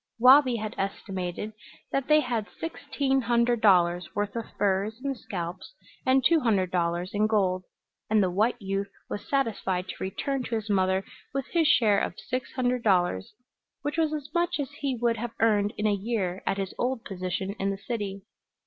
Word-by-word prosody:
Wabi 255 Hz, +1 st, +7 dB
had 215 Hz, -1 st, -3 dB
estimated 195 Hz, +1 st, -3 dB, 0.4 s
that 275 Hz, -1 st, 0 dB
they 305 Hz, 0 st, +6 dB
had 235 Hz, -5 st, -2 dB
sixteen 275 Hz, -4 st, -1 dB
hundred 235 Hz, 0 st, +2 dB
dollars' 180 Hz, -3 st, +3 dB
worth 205 Hz, +1 st, -1 dB
of 230 Hz, -1 st, -2 dB
furs 205 Hz, +3 st, +1 dB
and 275 Hz, -1 st, -1 dB
scalps 185 Hz, -4 st, -6 dB, 0.3 s
and 260 Hz, 0 st, +4 dB
two 335 Hz, +2 st, +5 dB
hundred 200 Hz, -, +1 dB
dollars 175 Hz, +1 st, 0 dB
in 210 Hz, +1 st, +2 dB
gold, 185 Hz, -4 st, +1 dB, 0.4 s
and 215 Hz, -1 st, +4 dB
the 185 Hz, -, +1 dB
white 220 Hz, +6 st, +1 dB
youth 195 Hz, -1 st, -2 dB, 0.2 s
was 205 Hz, -, -5 dB
satisfied 195 Hz, -9 st, 0 dB
to -, -, -4 dB
return 270 Hz, +8 st, -2 dB
to 235 Hz, -2 st, -3 dB
his 220 Hz, -1 st, -2 dB
mother 190 Hz, 0 st, +2 dB, 0.3 s
with 275 Hz, -2 st, -1 dB
his 330 Hz, -3 st, +3 dB
share 215 Hz, -8 st, +5 dB
of -, -, -3 dB
six 255 Hz, -1 st, -4 dB
hundred 250 Hz, -1 st, 0 dB
dollars, 180 Hz, -, +1 dB, 0.5 s
which 290 Hz, +3 st, -2 dB
was 315 Hz, -2 st, +2 dB
as 300 Hz, -2 st, -4 dB
much 345 Hz, -1 st, +1 dB
as 280 Hz, -1 st, -3 dB
he 280 Hz, -2 st, -2 dB
would 235 Hz, -1 st, +2 dB
have 235 Hz, +1 st, -5 dB
earned 210 Hz, -2 st, +3 dB
in 210 Hz, -, -1 dB
a 210 Hz, -, +4 dB
year 195 Hz, -3 st, -2 dB
at 195 Hz, -, +1 dB
his 195 Hz, -2 st, -3 dB
old 250 Hz, -1 st, -1 dB
position 185 Hz, 0 st, -3 dB
in 195 Hz, -, 0 dB
the 195 Hz, -, -2 dB
city. 200 Hz, -2 st, -4 dB
215 Hz, 185 wpm, -27 LUFS, 190-250 Hz, 0.5 s, Wabi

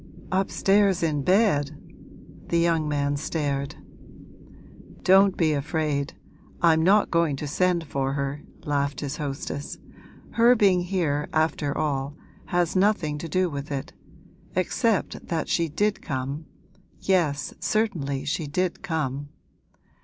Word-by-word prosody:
'Upstairs 195 Hz, 0 st, +2 dB
in 150 Hz, -3 st, +1 dB
bed!' 155 Hz, -5 st, +2 dB, 0.7 s
The 170 Hz, -, +1 dB
young 165 Hz, -2 st, +2 dB
man 145 Hz, -1 st, 0 dB
stared. 140 Hz, -2 st, -2 dB, 1.3 s
'Don't 195 Hz, +1 st, +5 dB
be 160 Hz, -3 st, +3 dB
afraid 145 Hz, -1 st, -1 dB, 0.4 s
I'm 160 Hz, -2 st, +4 dB
not 200 Hz, +5 st, +4 dB
going 165 Hz, -4 st, +2 dB
to 145 Hz, -, -5 dB
send 175 Hz, +3 st, +1 dB
for 135 Hz, -2 st, -2 dB
her!' 140 Hz, +1 st, -2 dB, 0.2 s
laughed 145 Hz, -1 st, -1 dB
his 145 Hz, 0 st, -4 dB
hostess; 145 Hz, -1 st, -4 dB, 0.5 s
'her 235 Hz, +2 st, +5 dB
being 195 Hz, -5 st, +4 dB
here, 165 Hz, -6 st, -1 dB
after 155 Hz, -2 st, 0 dB
all, 140 Hz, -1 st, -1 dB, 0.3 s
has 175 Hz, 0 st, 0 dB
nothing 185 Hz, -7 st, +2 dB
to 165 Hz, -, -6 dB
do 185 Hz, +1 st, +2 dB
with 145 Hz, -2 st, -6 dB
it, 135 Hz, -1 st, -4 dB, 0.6 s
except 205 Hz, +4 st, 0 dB
that 165 Hz, -2 st, -1 dB
she 165 Hz, -1 st, +1 dB
did 205 Hz, +7 st, 0 dB
come 140 Hz, +2 st, -4 dB, 0.5 s
yes, 155 Hz, -7 st, 0 dB
certainly, 155 Hz, -11 st, -1 dB
she 155 Hz, +1 st, -2 dB
did 180 Hz, +4 st, -1 dB
come. 145 Hz, -4 st, -3 dB
155 Hz, 125 wpm, -25 LUFS, 145-185 Hz, 1.3 s, Don't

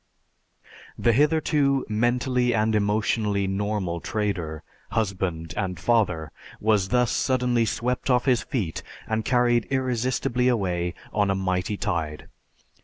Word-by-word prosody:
The 120 Hz, -, +3 dB
hitherto 145 Hz, -1 st, +2 dB
mentally 125 Hz, +2 st, +1 dB
and 110 Hz, 0 st, +2 dB
emotionally 105 Hz, -1 st, +1 dB
normal 95 Hz, -3 st, -2 dB
trader, 90 Hz, -8 st, -3 dB, 0.3 s
husband, 90 Hz, -6 st, -2 dB
and 90 Hz, -4 st, -2 dB
father 85 Hz, -6 st, +1 dB, 0.3 s
was 105 Hz, -3 st, +2 dB
thus 125 Hz, +1 st, +2 dB
suddenly 125 Hz, -3 st, +1 dB
swept 125 Hz, +4 st, -2 dB
off 125 Hz, -1 st, +3 dB
his 125 Hz, -3 st, +3 dB
feet 110 Hz, -, -3 dB, 0.3 s
and 110 Hz, 0 st, -1 dB
carried 120 Hz, -1 st, +2 dB
irresistibly 125 Hz, -1 st, 0 dB
away 90 Hz, -7 st, 0 dB, 0.2 s
on 100 Hz, -1 st, +2 dB
a 95 Hz, -, +2 dB
mighty 95 Hz, +1 st, -1 dB
tide. 80 Hz, -5 st, -3 dB
110 Hz, 115 wpm, -25 LUFS, 95-125 Hz, 0.3 s, The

